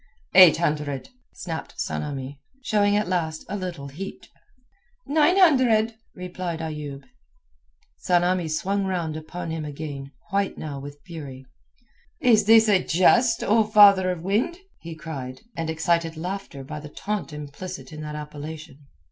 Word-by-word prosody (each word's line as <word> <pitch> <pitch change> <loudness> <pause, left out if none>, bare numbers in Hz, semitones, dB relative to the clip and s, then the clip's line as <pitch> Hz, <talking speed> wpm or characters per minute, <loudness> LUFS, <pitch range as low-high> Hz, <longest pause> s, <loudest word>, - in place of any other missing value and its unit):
"Eight 185 -4 +9
hundred," 150 - -2 0.2
snapped 165 -3 -7
Tsamanni, 140 -1 -4 0.2
showing 205 -3 +2
at 210 0 +1
last 165 -4 -2
a 205 - -4
little 175 -8 -5
heat. 185 +8 -8 0.8
"Nine 310 +5 +3
hundred," 250 - +4 0.2
replied 180 -2 -5
Ayoub. 150 -3 -6 1.0
Tsamanni 180 -1 +2
swung 195 +6 -1
round 175 -5 -2
upon 165 +2 -6
him 160 -1 -3
again, 145 -2 -6 0.2
white 200 0 0
now 145 -3 -5
with 145 +1 -9
fury. 140 -6 -9 0.7
"Is 225 -5 +4
this 225 +1 +7
a 195 -3 +4
jest, 230 +7 +3
O 220 +2 +4
father 205 -3 +6
of 175 -2 -3
wind?" 215 - 0 0.2
he 165 -1 -8
cried, 135 -6 -7
and 165 -1 -3
excited 165 0 0
laughter 180 -5 -5
by 150 +3 -7
the 150 0 -9
taunt 205 +4 -4
implicit 150 +5 -8
in 155 - -7
that 150 0 -6
appellation. 150 0 -8
170 Hz, 140 wpm, -24 LUFS, 150-200 Hz, 1.0 s, Eight